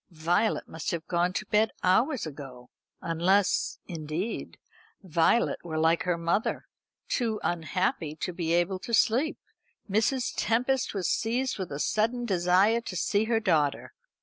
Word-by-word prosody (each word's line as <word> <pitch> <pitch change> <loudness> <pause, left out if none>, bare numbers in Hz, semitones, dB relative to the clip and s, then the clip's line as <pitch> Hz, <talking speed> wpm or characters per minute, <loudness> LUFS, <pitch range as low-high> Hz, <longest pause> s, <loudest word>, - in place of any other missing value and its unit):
Violet 175 +6 0
must 160 -2 -5
have 165 -1 -3
gone 175 0 +1
to 210 - -3
bed 215 +2 +2
hours 225 - +2
ago; 135 -5 -10 0.3
unless, 180 +4 +1
indeed, 165 +5 -4 0.5
Violet 175 +6 +2
were 160 -2 -4
like 165 +1 +3
her 180 -2 +1
mother, 170 +6 -1 0.4
too 225 -4 -1
unhappy 170 -2 -1
to 180 +3 -4
be 165 -2 -2
able 175 +2 +1
to 235 +4 0
sleep. 245 +8 +2 0.5
Mrs. 225 +5 +1
Tempest 245 +2 0
was 190 -3 -1
seized 240 +1 -1
with 185 -4 -4
a 140 - -3
sudden 230 +9 0
desire 190 +3 +3
to 195 - -7
see 205 +5 +1
her 225 0 +1
daughter. 155 -9 0
185 Hz, 145 wpm, -28 LUFS, 165-225 Hz, 0.5 s, like